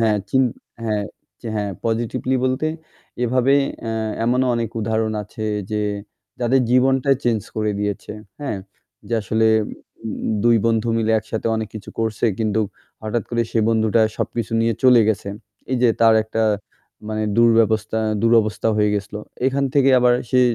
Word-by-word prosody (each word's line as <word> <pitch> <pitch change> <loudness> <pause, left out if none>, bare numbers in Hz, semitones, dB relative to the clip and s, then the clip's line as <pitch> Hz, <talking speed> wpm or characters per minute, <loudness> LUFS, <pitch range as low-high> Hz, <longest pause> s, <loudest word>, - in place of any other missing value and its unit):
হ্যাঁ, 110 -2 +3
চিন 130 - +4 0.4
হ্যাঁ, 105 -2 -1 0.5
হ্যাঁ 105 -1 -2
পজিটিভলি 115 +3 -1
বলতে 130 +4 0 0.6
এভাবে 130 +3 +3 0.3
অ্যা 115 - -3 0.3
এমনও 125 +2 +2
অনেক 115 -2 -1
উদাহরণ 110 0 0
আছে 110 +1 -7 0.3
যে 105 0 -1 0.6
যাদের 125 +2 +3
জীবনটাই 135 +2 +3
চেঞ্জ 115 -3 +2 0.2
করে 110 0 0
দিয়েছে, 105 0 -3 0.3
হ্যাঁ; 120 -8 -3 0.5
যে 120 - 0
আসলে 110 +3 +1 0.2
দু - - -5 0.8
২ 120 -1 +5
বন্ধু 115 0 +1
মিলে 110 0 0
একসাথে 110 +1 -5
অনেক 110 -1 -3
কিছু 105 -2 -8
করছে 110 -1 -1
কিন্তু 110 -1 +1 0.4
হঠাৎ 110 +1 -1
করে 120 -1 +1
সে - - 0
বন্ধুটা 110 0 +2 0.2
সবকিছু 115 -1 -3
নিয়ে 115 0 +1
চলে 125 -2 +7
গেছে। 105 -2 -1 0.4
এই - - +2
যে 125 - +6
তার 115 -1 +6
একটা 110 +1 -2 0.7
মানে 110 0 -2 0.2
দুর্ব্যবস্থা 115 -2 +3 0.2
দুরবস্থা 115 -1 +2
হয়ে 105 -1 +3
গেছিলো 105 +1 -4 0.3
এখান 140 +1 +1
থেকে 135 -1 +5
আবার 125 0 +4 0.2
সে 130 - +4
115 Hz, 150 wpm, -21 LUFS, 110-120 Hz, 0.8 s, চলে